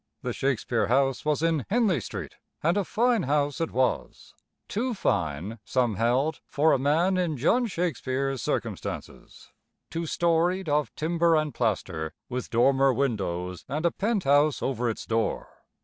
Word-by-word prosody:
The - - -2
Shakespeare 125 -3 0
house 135 -1 +2
was 150 +1 +1
in 165 -4 +1
Henley 205 - +2
Street, - - -6 0.3
and 170 +4 +3
a 205 - +1
fine 235 +3 +2
house 145 +1 0
it 165 - 0
was 130 0 -2 0.3
too 240 +3 -2
fine, 90 - -1
some 120 -1 +1
held, 125 +5 +1
for 150 +3 +3
a - - +3
man 165 +7 +2
in 165 -5 -1
John 235 - +2
Shakespeare's 135 - -2
circumstances - - -5 0.4
two 165 0 -3
storied, 170 +3 +1
of 150 0 +1
timber 165 +1 +2
and 155 -3 0
plaster, 95 -9 -2
with 125 0 -4
dormer 135 +3 +4
windows 95 -9 -2
and 155 +4 -2
a 170 - +4
penthouse 155 - +2
over 125 -2 0
its 110 - -5
door. 115 0 -1
145 Hz, 150 wpm, -27 LUFS, 120-170 Hz, 0.4 s, dormer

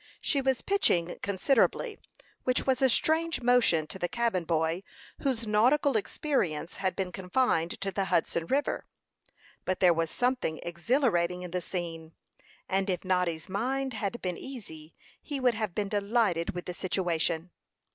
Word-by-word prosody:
She 280 - +1
was 265 -2 0
pitching 180 - +2
considerably, 275 - +1 0.4
which 255 0 +1
was 265 0 +2
a 265 - +5
strange 320 +5 +2
motion 235 -10 +4
to 190 - -8
the 175 - 0
cabin 230 -5 0
boy, 160 +1 0 0.4
whose 255 -5 -1
nautical 250 +7 +3
experience 190 - -1
had 190 -2 -1
been 190 -2 -2
confined 180 -2 0
to 195 0 -1
the 195 0 -1
Hudson 170 -2 0
River. 280 +2 0 0.8
But 185 - -1
there 180 -2 +6
was 165 0 0
something 250 -10 0
exhilarating 180 -2 +1
in 180 - -7
the 180 0 -1
scene, 165 -3 -5 0.5
and 195 +1 0
if 180 0 -2
Noddy's 180 -3 0
mind 260 +7 -1
had 220 +2 -3
been 180 -2 -2
easy, 165 - -9 0.3
he 285 -2 -4
would 250 -2 +3
have 215 -5 -3
been 205 -2 -1
delighted 200 -5 +1
with 175 - -5
the 180 - -4
situation. 175 -2 -1
195 Hz, 155 wpm, -29 LUFS, 175-250 Hz, 0.8 s, there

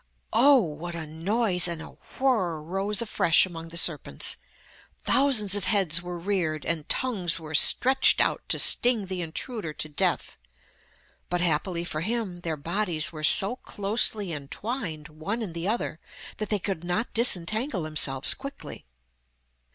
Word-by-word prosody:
Oh! 270 -1 +6
what 170 +2 -6
a 165 -2 -4
noise 180 +4 +1
and 170 -2 -4
a 160 - -9 0.3
whirr 215 -12 +1
rose 195 +7 -2
afresh 170 -7 +4
among 165 -2 -9
the 165 +1 -5
serpents. 150 - 0 0.7
Thousands 250 -8 +3
of 205 -2 +1
heads 185 -6 +2
were 175 0 -6
reared, 170 -4 -2
and 160 -3 -3
tongues 195 -11 +1
were 155 -1 -9
stretched 260 - +4
out - - +1
to - - +1
sting 240 -4 +3
the 185 -1 -4
intruder 170 +2 -5
to 155 - -5
death, 150 - -1 0.9
but 175 - -1
happily 170 +1 0
for 155 -3 -3
him 210 -2 -3
their 160 -3 -3
bodies 170 +1 0
were 155 -2 -9
so 195 +9 +4
closely 205 -3 0
entwined 155 - -5
one 175 +10 -5
in 185 -6 -6
the 170 +2 -4
other 215 -7 -2 0.4
that 215 - -4
they 210 - +2
could 190 -3 -4
not 180 +7 -2
disentangle 220 - +1
themselves 145 -4 +2
quickly. 275 - -9
180 Hz, 150 wpm, -26 LUFS, 160-215 Hz, 0.9 s, Oh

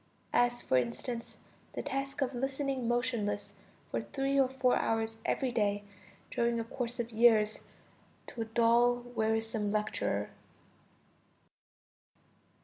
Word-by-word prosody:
as, 245 0 +2
for 130 - +2
instance, 230 - -3 0.4
the - - -4
task 275 0 -2
of 265 0 -2
listening 270 0 -1
motionless 225 -4 -1 0.4
for - - 0
three 275 0 0
or 265 -2 +4
four 260 -1 +2
hours 225 0 -1
every 260 -2 0
day, 205 -3 +1 0.5
during 235 0 +1
a - - -1
course 240 +1 -4
of 235 0 -2
years, 220 -2 +4 0.7
to 235 - -6
a - - -1
dull, 235 +2 +3
wearisome 220 -1 0
lecturer. 210 +1 -1
235 Hz, 120 wpm, -32 LUFS, 220-255 Hz, 0.7 s, or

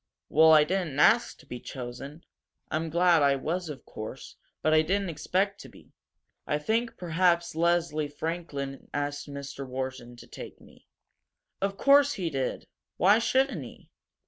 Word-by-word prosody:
"Well, 160 +2 +6
I 155 -1 +8
didn't 165 -4 -2
ask 235 +10 +4
to 155 - -18
be 125 -3 -7
chosen. 135 +6 -8 0.5
I'm 160 +1 -1
glad 170 0 +4
I 140 -1 +4
was, 165 +5 -3
of 145 - -8
course, 110 +5 -8 0.3
but 155 - +3
I 155 - +6
didn't 190 +3 -1
expect 190 +6 -1
to - - -11
be. - - -19 0.5
I 150 - +1
think 225 +10 -1
perhaps 170 0 +1
Leslie 165 -2 +1
Franklin 145 -3 -5
asked 145 0 -3
Mr. 140 0 -7
Wharton 130 -1 -5
to 120 - -13
take - - -10
me." - - -20 0.7
"Of 195 0 -1
course 285 +3 +5
he 175 -5 -3
did! 135 -2 -3 0.3
Why 205 +5 +5
shouldn't 265 +4 +1
he?" - - -13
160 Hz, 155 wpm, -28 LUFS, 140-180 Hz, 0.7 s, I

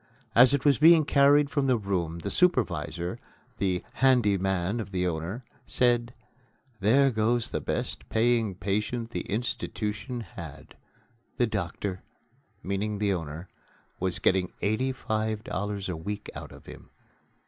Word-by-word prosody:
As 125 +3 +7
it 140 0 0
was 145 -1 +4
being 160 0 +7
carried 140 0 +4
from 140 -2 +1
the 130 -2 +3
room 90 -6 -2
the 100 +4 -4
supervisor, 125 - 0 0.4
the 90 -2 0
"handy 125 -6 +4
man" 95 +2 -1
of 110 - -5
the 90 -2 -1
owner, 90 +8 -3 0.2
said: 120 +1 +1 0.6
"There 135 +7 +4
goes 115 +1 +1
the - - -2
best - - -4
paying 115 -3 +2
patient 105 +5 -2
the - - -2
institution 120 +1 -3
had; 85 -9 -10 0.6
the 120 - +3
doctor" 100 -3 -3 0.6
(meaning 100 +2 -2
the 100 -1 +1
owner) 80 0 -5 0.5
"was 90 -1 -1
getting 90 +1 +1
eighty 110 +6 +1
five 110 -4 -2
dollars 100 0 -3
a 90 - -3
week 100 +6 -6
out - - -8
of - - -14
him." - - -12
105 Hz, 140 wpm, -27 LUFS, 95-120 Hz, 0.6 s, As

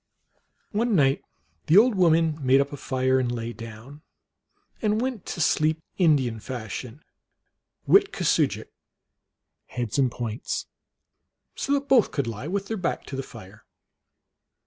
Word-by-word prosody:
One 225 +1 +1
night 135 -4 +3 0.5
the 165 +4 +5
old 235 +3 +6
women 165 -5 +2
made 130 +1 +5
up 140 +1 -1
a - - -5
fire, 130 -1 +1
and 125 -2 -1
lay 120 -1 -4
down 115 +6 -11 0.8
and 215 0 +1
\vent 250 -4 -3
to 170 - -4
sleep 155 +1 +2 0.2
Indian 135 -10 +3
fashion, 125 +3 -7 0.8
witkusoodi - - +3
jik, - - -31 1.0
heads 120 +1 -3
and 130 -2 +3
points, 115 -1 -4 0.9
so 280 - -2
that 280 0 0
both 255 -6 +5
could 140 - -2
lie 115 +4 -5
with 195 +3 -2
their 220 +2 -4
back 180 -3 -2
to 135 - -7
the 135 - -2
fire. 100 -5 -13
140 Hz, 140 wpm, -25 LUFS, 120-185 Hz, 1.0 s, old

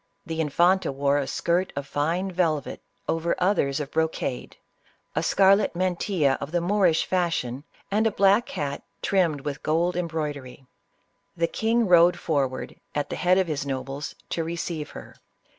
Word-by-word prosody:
The 160 0 -2
infanta 175 +3 +2
wore 140 +1 +1
a 140 - -2
skirt 175 +6 0
of 140 0 -3
fine 165 +7 -1
velvet 165 -6 -1 0.3
over 165 +1 0
others 155 -7 +1
of 145 -1 -5
brocade, 160 -5 -2 0.6
a - - +1
scarlet 195 0 +4
mantilla 175 -5 +1
of 140 - -5
the 175 - +1
Moor 190 +2 +3
ish 160 -2 +2
fashion, 160 -7 -1 0.3
and 215 +2 +3
a - - +1
black 200 +3 +3
hat 140 -1 -3 0.2
trimmed 170 -7 +1
with 145 +1 -5
gold 170 +3 +1
em 180 -1 -1
broidery. 145 -5 -5 0.7
The 170 - +2
king 225 +6 +1
rode 175 -1 +6
forward, 140 -5 -2 0.2
at 145 - -2
the - - -2
head 180 0 +3
of 190 - +3
his 150 -4 -2
nobles, 135 +1 -4 0.2
to 165 - -1
receive 165 -2 -4
her. - - -11
165 Hz, 160 wpm, -25 LUFS, 145-180 Hz, 0.7 s, rode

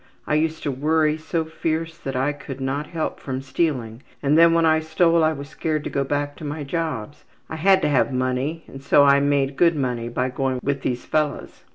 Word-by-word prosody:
I - - -1
used 160 +1 0
to 145 - -1
worry 155 +3 +1
so 160 +1 -2
fierce 160 0 -3
that 135 -5 -6
I 135 +3 +1
could 140 -2 -9
not 135 +3 -2
help 160 -2 -3
from 130 -1 -4
stealing 130 -6 -2 0.2
and 145 +1 +3
then 165 +1 +7
when 165 0 +3
I 160 0 +4
stole 165 +1 +2
I 155 - +3
was 140 -2 -6
scared 155 0 -2
to - - -5
go 140 - 0
back 145 +1 -2
to - - -10
my 150 +1 -4
jobs. 145 -4 -4 0.3
I 160 - -4
had 190 +3 +4
to - - +3
have 140 -1 +2
money 130 +5 -1
and 135 - -10
so 140 +1 +5
I 140 0 +6
made 140 -1 +1
good 170 -1 +4
money 125 -4 -2
by 125 +2 -1
going 130 -1 -1
with 140 -1 -1
these 125 -2 -3
fellows. 150 -2 -2
145 Hz, 220 wpm, -23 LUFS, 135-160 Hz, 0.3 s, then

